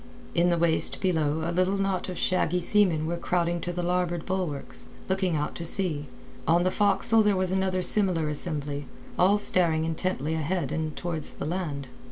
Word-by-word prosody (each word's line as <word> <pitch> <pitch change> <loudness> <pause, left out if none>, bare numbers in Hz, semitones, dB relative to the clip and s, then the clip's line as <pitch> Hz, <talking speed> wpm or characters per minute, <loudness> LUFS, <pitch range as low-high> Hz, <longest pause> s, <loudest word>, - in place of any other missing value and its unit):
In 175 +1 +3
the 170 - +2
waist 165 -1 +3
below 160 -4 0
a - - -1
little 185 +3 +1
knot 195 -2 -1
of 180 - -5
shaggy 180 -1 +1
seamen 175 -4 +2
were 170 +2 -2
crowding 170 0 -1
to 175 - -3
the 175 0 -3
larboard 175 -1 -1
bulwarks, 145 - -3 0.2
looking 190 -3 0
out 150 0 -2
to 170 - -5
sea; 165 -4 -1 0.4
on 170 +2 +4
the 185 - +1
forecastle 210 +3 +3
there 210 -2 +3
was 185 -1 0
another 190 -1 0
similar 180 -7 +3
assembly, 145 -2 -4 0.3
all 195 +3 +5
staring 165 -5 +2
intently 160 -2 -2
ahead 160 -2 -1
and 155 -1 -3
towards 165 -4 -4
the - - -6
land. 155 -4 -3
175 Hz, 180 wpm, -27 LUFS, 160-185 Hz, 0.4 s, all